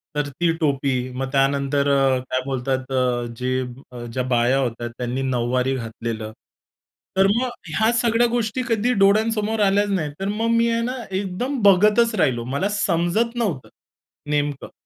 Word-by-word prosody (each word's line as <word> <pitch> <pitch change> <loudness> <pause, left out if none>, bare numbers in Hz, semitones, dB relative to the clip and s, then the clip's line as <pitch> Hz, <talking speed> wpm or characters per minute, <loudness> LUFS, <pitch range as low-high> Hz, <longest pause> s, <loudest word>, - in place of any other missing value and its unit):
तर 145 -1 -1
ती 165 +5 0
टोपी. 140 -3 +1 0.2
मग 130 +1 -3
त्यानंतर 140 +1 +1
अ, 135 -2 +3
काय 130 0 +1
बोलतात 130 0 -2
अ, 125 -2 0
जे 130 +1 -1 0.5
ज्या 130 - -1
बाया 120 +3 +3
होत्या 120 -2 -2
त्यांनी 125 +2 -3
नऊवारी 125 0 0
घातलेलं. 115 -2 -5 0.8
तर 195 0 +5
मग 250 +1 0 0.2
ह्या 220 +8 +2
सगळ्या 235 0 +2
गोष्टी 235 0 -1
कधी 230 +2 +1
डोळ्यांसमोर 215 +2 +2
आल्याच 200 +1 +2
नाहीत. 165 -7 -1
तर 195 - -2
मग 215 +3 -1
मी 230 0 +3
आहे 230 0 0
ना 250 +2 -2 0.2
एकदम 200 +8 -2
बघतच 210 +4 +5
राहिलो. 125 - +1
मला 195 +8 0
समजत 205 +3 0
नव्हतं 185 - -2 0.6
नेमकं. 145 -1 -2
150 Hz, 150 wpm, -22 LUFS, 130-215 Hz, 0.8 s, तर